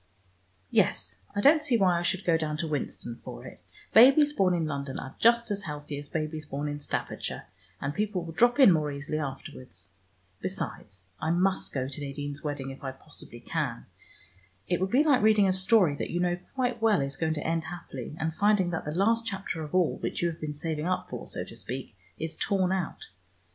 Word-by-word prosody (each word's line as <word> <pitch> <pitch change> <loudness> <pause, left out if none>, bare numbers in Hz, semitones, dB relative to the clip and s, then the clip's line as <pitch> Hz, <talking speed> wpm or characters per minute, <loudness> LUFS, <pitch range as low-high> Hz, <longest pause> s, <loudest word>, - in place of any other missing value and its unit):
Yes, - - +2 0.2
I 205 - +1
don't 305 +6 +6
see 280 -6 +2
why 180 -4 +3
I - - -2
should 185 +2 0
go 170 - +4
down 155 -1 -1
to 165 +1 -2
Winston 135 -5 -4
for - - -8
it. - - -11 0.3
Babies 275 +5 +7
born 185 -7 +3
in 165 -2 0
London 140 -3 -3
are 135 - -6
just 235 -1 +4
as 200 -1 -2
healthy 150 -1 -5
as 145 0 -9
babies 155 0 -3
born 145 0 -4
in 145 0 -3
Staffordshire, 145 - -4 0.3
and 140 +1 -2
people 205 -1 -1
will 165 -1 -7
drop 240 - +4
in 260 -8 +9
more 155 -3 +1
easily 145 +2 -3
afterwards. 135 - -7 0.5
Besides 95 -2 -4 0.2
I 155 - -1
must 185 +3 +1
go 130 -2 -2
to 140 +2 -7
Nadine's 145 +1 -5
wedding 145 -3 -3
if 135 - -11
I 135 -1 -4
possibly 135 - -9
can. - - -3 0.8
It 175 0 0
would 190 - +1
be 260 +7 +4
like 285 -6 +4
reading 215 -2 +5
a 185 - +3
story 185 -3 +4
that - - -3
you 175 - -1
know 175 0 +1 0.2
quite 250 -3 0
well 220 -6 +4
is 140 0 -2
going 160 -1 0
to - - -4
end 165 0 0
happily, 160 -6 -7
and 160 0 -1
finding 200 -1 +3
that 165 - -3
the 150 +1 -3
last 230 +5 +2
chapter 195 -6 -3
of 150 +2 -5
all, 180 -4 +3
which - - -3
you 170 - +3
have 165 - -8
been 150 -1 -4
saving 155 +1 -3
up 185 0 -2
for, - - -6
so - - -3
to - - -11
speak, 125 -3 -6 0.2
is 160 0 -3
torn 190 0 +1
out. 190 -4 -2
165 Hz, 210 wpm, -28 LUFS, 145-195 Hz, 0.8 s, in